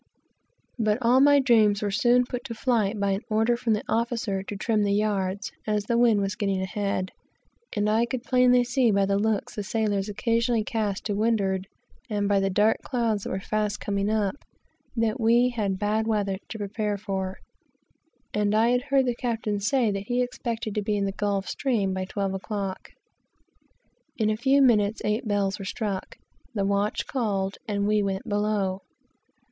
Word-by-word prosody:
But 215 -1 +2
all 245 +3 +5
my 285 +1 +6
dreams 220 -6 +3
were 205 - 0
soon 240 +4 +3
put 245 0 -5
to 235 -4 -5
flight 220 -4 0
by 200 0 +1
an 195 +1 -1
order 220 +2 +2
from 235 -1 0
the 210 - -1
officer 230 -4 -1
to 200 +2 -7
trim 215 +1 0
the 200 -1 +2
yards, 200 -2 -1 0.2
as 210 -1 +1
the 235 - 0
wind 235 -3 +4
was 195 -1 -1
getting 195 -2 -1
ahead; 190 0 -2 0.6
and 205 0 +1
I 225 +3 +2
could 250 -1 -4
plainly 250 0 +4
see 245 0 +2
by 200 -2 +3
the 200 0 +1
looks 215 -1 -1
the 210 - -4
sailors 205 -1 -1
occasionally 230 +2 +1
cast 210 -3 -2
to 210 - -1
windward, 200 -3 0 0.4
and 205 -2 0
by 200 -1 +3
the 195 0 +1
dark 210 +3 +3
clouds 230 -5 -1
that - - -3
were 190 - -2
fast 210 +1 -2
coming 200 0 -1
up, 215 +2 0 0.6
that 225 +1 0
we 235 +2 +4
had 205 -6 -2
bad 215 +2 0
weather 200 -3 0
to 225 - -6
prepare 205 0 -2
for, 190 -2 -4 1.0
and 210 0 +1
had 240 +3 +3
heard 270 0 +2
the 245 - +1
captain 225 -4 -2
say 225 +2 +1
that 195 0 -4
he 245 0 +1
expected 235 -3 -4
to 210 - -1
be 210 0 -1
in 200 - 0
the 195 - -1
Gulf 200 -1 -2
Stream 220 -9 0
by 190 0 -2
twelve 195 0 -2
o'clock. 195 0 -4 1.3
In 215 -2 +2
a - - 0
few 270 +5 +3
minutes 220 -4 +3
eight 215 +3 -1
bells 200 -2 0
were - - -5
struck, 200 -1 -4 0.4
the 200 -2 0
watch 200 +1 0
called, 200 -6 -2
and 200 -1 -1
we 210 0 +3
went 195 -1 -2
below. 205 -2 0
210 Hz, 185 wpm, -26 LUFS, 200-230 Hz, 1.3 s, my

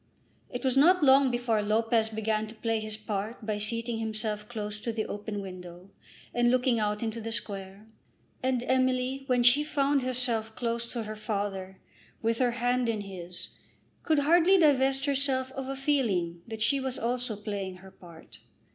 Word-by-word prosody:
It 245 - -5
was 260 -1 +2
not 340 +5 +5
long 270 0 +6
before 240 -3 +1
Lopez 220 +1 +2
began 220 0 -1
to 220 - -11
play 225 0 -1
his 215 0 -4
part 215 +1 -4
by 210 -1 -1
seating 230 +2 -2
himself 215 -1 -3
close 210 -3 -4
to 230 - -2
the 220 -1 -2
open 205 0 -5
window 180 0 -10 0.4
and 240 0 +3
looking 250 -1 +2
out 210 +1 -1
into 225 0 -3
the 225 +1 -5
Square; 200 -2 -5 0.6
and 255 -1 0
Emily 260 +1 +1
when 250 -2 +3
she 250 +5 +6
found 285 -2 +1
herself 240 -3 -1
close 235 -1 -2
to 235 -2 -2
her 215 0 -6
father, 200 -3 -4 0.4
with 230 0 0
her 250 -1 +3
hand 245 0 0
in 220 -2 -1
his, 180 -3 -7 0.5
could 315 -2 +2
hardly 340 +6 +5
divest 270 -4 +3
herself 270 -2 +1
of 270 0 -5
a 270 - -3
feeling 215 - 0
that 220 -1 -3
she 275 +3 +2
also 245 -2 -2
was 210 - -15
playing 200 -3 -4
her 190 +1 -14
part. 170 -3 -15
230 Hz, 175 wpm, -29 LUFS, 210-260 Hz, 0.6 s, long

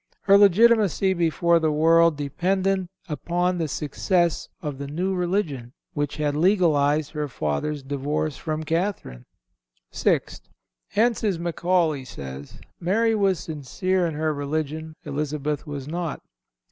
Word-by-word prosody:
Her 200 - +5
legitimacy 200 -1 +5
before 170 0 +2
the 160 -1 +1
world 165 +1 +4
depended 185 +6 0 0.4
on 175 +1 +1
the 160 - 0
success 170 +4 0
of 145 -3 -5
the 140 - -5
new 180 +7 -2
religion, 175 - -2 0.2
which 145 -1 -2
had 150 -1 0
legalized 155 -4 +2
her 150 -2 -3
father's 135 - -2
divorce 145 +2 -2
from 155 -1 -4
Catherine. 165 - -2 0.7
Sixth—Hence 210 - -1
as 200 -5 +1
Macaulay 170 -3 0
says, 70 - -9 0.2
Mary 225 +6 +2
was 195 -4 +2
sincere 175 +5 -1
in 160 - -4
her 155 0 0
religion; 155 +2 -3
Elizabeth 150 +1 -3
was 140 -2 -6
not. 170 0 -4
160 Hz, 120 wpm, -24 LUFS, 145-185 Hz, 0.7 s, Her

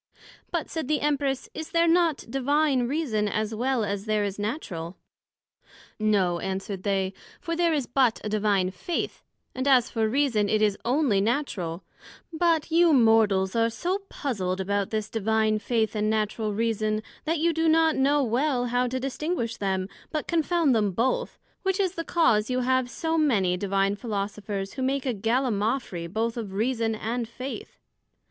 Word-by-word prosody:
But, - - -2
said 320 -5 -4
the 305 +1 +1
Empress, 280 -2 0
Is 315 0 -6
there 335 0 +3
not 335 -3 +2
Divine 270 0 +1
Reason, 245 -8 0
as 215 +1 -1
well 245 +1 0
as 200 0 -3
there 215 -1 +1
is 200 0 -3
Natural? 190 - -4 1.0
No, 195 -5 +2
answered 190 +1 -4
they: 195 -1 0 0.3
for 335 - -3
there 340 0 +2
is 290 -5 0
but 245 -2 +2
a - - -3
Divine 205 -3 +1
Faith, 260 - -4 0.3
and 260 +2 -2
as 255 -3 +4
for 220 -2 +1
Reason 235 -6 +1
it 215 - +2
is 210 -2 +2
onely 250 -5 +2
Natural; 195 - -2 0.5
but 325 -1 +1
you 335 0 +5
Mortals 220 -6 +4
are 230 0 +3
so 360 - -2
puzled 190 -10 -2
about 200 +1 -1
this 215 -1 -2
Divine 220 0 +1
Faith, 220 -1 0
and 215 0 +1
Natural 215 0 -1
Reason, 215 0 0 0.2
that 325 +2 +1
you 335 +2 +2
do 325 0 +2
not 320 0 +4
know 280 +2 +3
well 250 +1 +1
how 250 0 +2
to 260 +1 -2
distinguish 265 -3 -2
them, 190 -2 -1 0.2
but 305 -2 -3
confound 335 -3 +2
them 210 -4 +1
both, 260 - 0 0.2
which 385 0 0
is 380 -3 +2
the 335 -2 -5
cause 245 -12 +2
you 255 0 0
have 260 0 +1
so 325 +6 -1
many 205 -12 +2
divine 195 +1 0
Philosophers 200 -2 -4
who 265 - -5
make 270 +1 0
a 255 - 0
Gallimafry 225 -5 -1
both 225 +3 -1
of 210 -5 -5
Reason 225 +1 0
and 230 +2 -3
Faith. 255 +3 -7
230 Hz, 165 wpm, -26 LUFS, 205-285 Hz, 1.0 s, you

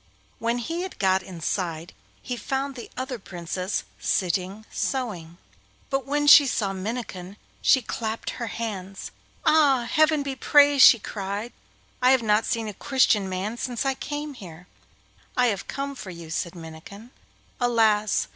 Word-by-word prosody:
When 235 +1 0
he 330 +9 -3
had 375 0 -6
got 190 -1 +2
inside 170 -2 -4 0.3
he 250 - -3
found 270 +4 -3
the 245 -3 -9
other 255 -1 -4
Princess 180 +1 -4 0.2
sitting 190 +3 -1
sewing, 185 -11 -3 0.5
but 270 -1 -1
when 290 +1 0
she 290 -1 +9
saw 200 -6 -1
Minnikin 195 -2 -5 0.2
she 260 - +4
clapped 220 0 -4
her 235 - -5
hands. 195 -4 -5 0.3
'Ah, 275 -6 +4
heaven 310 -1 +4
be 275 -1 -4
praised!' 285 -1 +6
she 235 - +7
cried, 205 +2 -5 0.5
'I 250 +1 +5
have 260 -3 +2
not 210 0 +2
seen 230 -2 -1
a 210 - -5
Christian 210 -4 +2
man 195 +5 -3
since 245 0 -3
I 270 - +2
came 290 +2 -5
here.' 180 -8 -11 0.7
'I 250 - +4
have 205 -5 -1
come 280 0 -4
for 230 -8 -9
you,' 170 -2 -9
said 170 +2 -3
Minnikin. 170 +8 -11 0.5
'Alas! 220 -4 +2
225 Hz, 150 wpm, -25 LUFS, 190-265 Hz, 0.7 s, she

